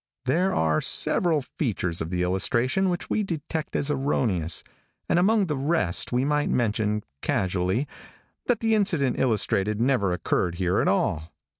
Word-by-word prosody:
There 175 +9 +2
are 80 -1 +2
several 160 -5 +2 0.2
features 95 - -1
of 80 - -3
the 90 0 -1
illustration 120 - +1
which 175 -1 -3
we 215 - +1
detect 160 -4 -4
as 145 +1 0
erroneous, 110 - 0 0.4
and - - +2
among 205 +2 +3
the 150 -4 -2
rest 135 - 0
we 125 +2 +1
might 150 0 +1
mention, 105 -2 0 0.2
casually, 95 +8 0 0.6
that 245 -3 +1
the 225 -1 +2
incident 170 - +1
illustrated 105 -3 0
never 120 -6 +2
occurred 90 0 -1
here 90 0 0
at - - 0
all. 80 +3 0
125 Hz, 150 wpm, -25 LUFS, -, 0.6 s, among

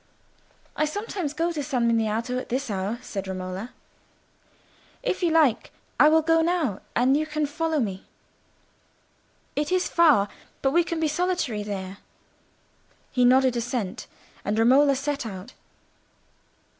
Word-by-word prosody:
"I 305 - +1
sometimes 370 -1 -3
go 330 +3 -1
to 310 -3 -3
San 255 -5 0
Miniato 230 +2 0
at - - -8
this 260 0 -2
hour," 200 +4 -2
said 195 -2 -5
Romola. 185 +4 -5 1.3
"If 445 -7 -1
you 350 - +2
like, 310 -8 +3 0.3
I 300 - +8
will 320 0 +4
go 325 +1 +3
now, 320 - 0
and 255 +3 +3
you 310 +1 0
can 305 -1 -1
follow 320 +1 -1
me. 195 -6 -3 1.5
It 295 +3 -1
is 370 0 +2
far, 300 -12 +4 0.4
but 270 - +3
we 345 +4 +4
can 335 -1 -3
be 320 - +1
solitary 305 - -1
there." 195 -1 -6 1.1
He 250 - +2
nodded 255 0 +4
assent, 235 -4 -3 0.4
and 205 +2 -1
Romola 270 +5 +5
set 285 +1 -2
out. 200 +1 -8
270 Hz, 140 wpm, -25 LUFS, 220-315 Hz, 1.5 s, I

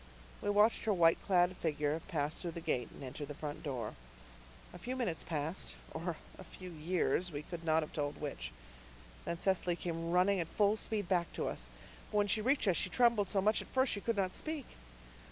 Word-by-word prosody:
We - - -1
watched 210 +3 +4
her 215 - +3
white 165 -2 +5
clad 180 -1 +3
figure 150 0 0
pass 155 -4 -1
through 170 -2 -4
the - - -2
gate 125 -8 -1
and - - -11
enter 135 +3 -5
the 145 0 -6
front 150 +1 -5
door. 125 -7 -3 0.8
A 180 - -9
few 250 +7 -3
minutes 225 -11 -1
passed 160 +2 -3 0.2
or 165 0 -3 0.2
a - - -7
few 185 +1 -9
years 175 +2 0
we 145 -1 -4
could 170 +1 -7
not 160 0 +3
have 150 - -8
told 145 -1 -2
which. 140 - -4 0.7
Then 170 - -2
Cecily 180 -2 +1
came 165 -1 -3
running 180 +3 +4
at 165 - -1
full 205 +4 +3
speed 215 -3 -2
back 175 -2 +1
to - - -1
us. - - -4 0.4
But 210 - -1
when 205 0 +4
she 215 +2 +1
reached 265 0 +2
us 180 - +4
she 185 - +1
trembled 235 -2 +4
so 195 - +2
much 215 +1 +4
that - - -7
at - - -19
first 260 0 +4
she 200 - -3
could 230 0 0
not 185 -2 +1
speak. 310 -4 -3
175 Hz, 215 wpm, -35 LUFS, 155-205 Hz, 0.8 s, white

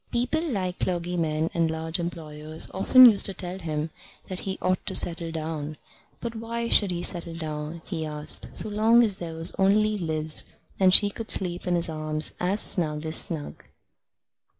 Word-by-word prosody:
People 245 +6 -1
like 185 -6 -3
clergymen 170 -3 -2
and 165 -1 +1
large 160 +1 -3
employers 155 -2 -4
often 255 +7 +7
used 210 -4 +6
to 195 - -7
tell 180 0 -7
him 155 -2 -4 0.4
that 185 -1 -6
he 190 -1 -5
ought 185 0 -1
to - - 0
settle 170 -1 +1
down. 155 -2 -5 0.4
But 235 -1 -5
why 230 +1 -4
should 205 - +3
he 175 -1 -4
settle 170 -2 0
down, 155 0 -6
he 165 -4 -5
asked, 150 -1 0
so - - +1
long 220 +3 +3
as 205 -4 0
there 165 -2 -6
was 165 +1 +3
only 210 +2 +2
Liz, 155 -2 0 0.4
and 190 -1 +5
she 205 +2 +7
could 225 +2 -8
sleep 180 -1 0
in 175 - +1
his 170 - +5
arms 155 -1 -1
as 190 +4 0
snug 155 -3 -2
as 160 0 0
snug? 155 -3 -5
170 Hz, 175 wpm, -25 LUFS, 160-195 Hz, 0.4 s, often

